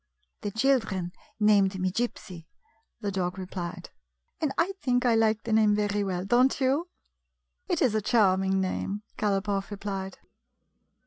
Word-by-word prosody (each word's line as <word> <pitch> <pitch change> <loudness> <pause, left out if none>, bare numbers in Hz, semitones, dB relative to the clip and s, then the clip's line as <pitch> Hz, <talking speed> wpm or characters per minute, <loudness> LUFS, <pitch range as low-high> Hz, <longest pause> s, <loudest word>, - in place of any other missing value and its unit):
" - - -47
The 205 - -2
children 220 -6 +1 0.3
named 200 -3 +3
me 185 0 0
Gypsy," 185 -6 -4 0.5
the 205 -2 -2
dog 180 -1 -2
replied, 180 -2 -6 0.2
" 60 - -41
and 305 -3 +1
I 345 +4 +2
think 250 -1 +1
I 240 - +4
like 220 -1 +2
the 225 - -2
name 215 -1 +4
very 205 0 0
well. 185 -2 -2
Don't 245 +5 +3
you? 280 +6 +1 0.4
" 485 - -54
"It 345 -5 +1
is 250 -5 +3
a 215 - +1
charming 190 -3 +3
name," 195 +2 -2 0.2
Galopoff 200 -1 0
replied. 195 -2 -5
205 Hz, 155 wpm, -27 LUFS, 190-235 Hz, 0.5 s, I